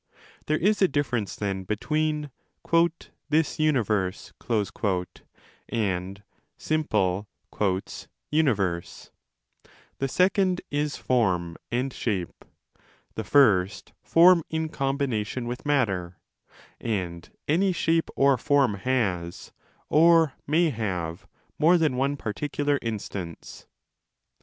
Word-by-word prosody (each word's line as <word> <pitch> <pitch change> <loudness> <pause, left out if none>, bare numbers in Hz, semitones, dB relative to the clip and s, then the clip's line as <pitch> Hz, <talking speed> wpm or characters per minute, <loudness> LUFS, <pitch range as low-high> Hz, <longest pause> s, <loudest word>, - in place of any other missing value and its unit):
There 155 - +2
is 205 +6 +1
a 190 - +6
difference, 125 - -1
then, 95 -2 -3
between 150 +8 -1 1.0
'this 155 +1 +1
universe' 110 -11 0 1.4
and 100 -3 -2 0.3
simple 105 -11 0 1.0
'universe'; 100 - 0 0.9
the 135 - 0
second 185 +4 +2
is 145 0 -1
form 90 -9 0 0.2
and 125 +2 -1
shape, 95 -7 -3 0.7
the - - -4
first 100 -9 +3
15 - - -30
form 170 0 +6
in 160 0 -2
combination 135 -5 -2
with 125 +4 -5
matter; 95 -11 0 0.6
and 90 -7 -3 0.2
any 185 +6 +3
shape 165 -1 +1
or 135 -2 +4
form 140 -4 +3
has, 95 -6 -2 0.4
or 165 -2 +5
may 160 +2 +3
have, 90 -8 -4 0.3
more 165 +4 +5
than 155 -6 +1
one 140 +2 0
particular 145 +5 -1
instance. 100 -6 -6
130 Hz, 95 wpm, -26 LUFS, 100-155 Hz, 1.4 s, a